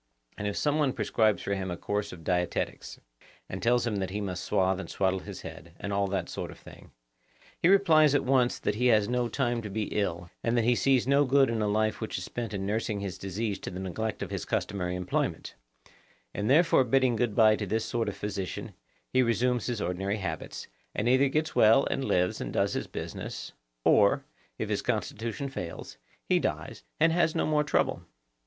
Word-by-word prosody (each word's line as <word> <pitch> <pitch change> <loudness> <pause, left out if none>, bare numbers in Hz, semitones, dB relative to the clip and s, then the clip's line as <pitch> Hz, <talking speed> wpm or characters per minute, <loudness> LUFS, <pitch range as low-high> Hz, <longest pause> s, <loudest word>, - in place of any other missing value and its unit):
And 105 - -3
if 100 - -3
some 150 +1 +1
one 140 -4 +2
prescribes 110 -2 +1
for 100 - -1
him 95 -1 -3
a 85 - -4
course 105 +2 -2
of 80 -2 -10
dietetics, 90 0 -2 0.5
and 95 - -6
tells 120 +1 +3
him 110 -4 -1
that 95 -1 -2
he 100 +3 -3
must 95 -3 -4
swathe 95 -2 +1
and - - -7
swaddle 95 -1 0
his - - -8
head, 85 +1 -10
and 100 - -4
all 100 0 +1
that 95 -3 -2
sort - - -5
of - - -11
thing, - - -14 0.7
he - - +4
replies 160 -7 +5
at - - +2
once 125 -2 +3
that 105 - -1
he 125 +4 +1
has 105 -4 +4
no 125 0 0
time 120 -1 0
to 105 - -6
be 105 +1 -3
ill, 90 -4 -2
and 115 +1 +1
that 115 - +3
he 120 +2 +4
sees 130 0 +2
no 140 +2 +4
good 135 -2 +4
in 115 -1 -1
a 105 - +1
life 110 +2 0
which 110 - -3
is 90 - -4
spent 120 +4 -5
in 95 -2 -3
nursing 105 0 -1
his 95 -2 -5
disease 100 +2 -3
to - - -6
the 90 - -6
neglect 105 +4 -3
of - - -7
his - - -3
customary 90 -2 -2
employment; 90 0 -2 0.8
and 105 +2 -2
therefore 160 0 +5
bidding 130 0 +2
good 110 -2 0
bye 110 -2 +6
to 105 -2 -4
this 110 +3 0
sort 115 -1 -1
of 100 - -7
physician, 100 -2 -4 0.4
he 130 - +5
resumes 125 0 +1
his 120 -3 -2
ordinary 95 +3 -1
habits, 95 -7 -5 0.3
and 110 - 0
either 130 +2 +4
gets 155 +3 -1
well 115 +6 +6
and 135 - -1
lives 90 0 +1
and - - -4
does - - +1
his - - -3
business, - - -6 0.3
or, - - +4 0.3
if - - -3
his - - -1
constitution 115 +4 -2
fails, 90 - -7 0.3
he - - +3
dies - - -3 0.2
and 165 +1 +5
has 165 -2 +2
no - - +1
more 150 -1 +2
trouble. 145 - +1
110 Hz, 210 wpm, -28 LUFS, 95-125 Hz, 0.8 s, bye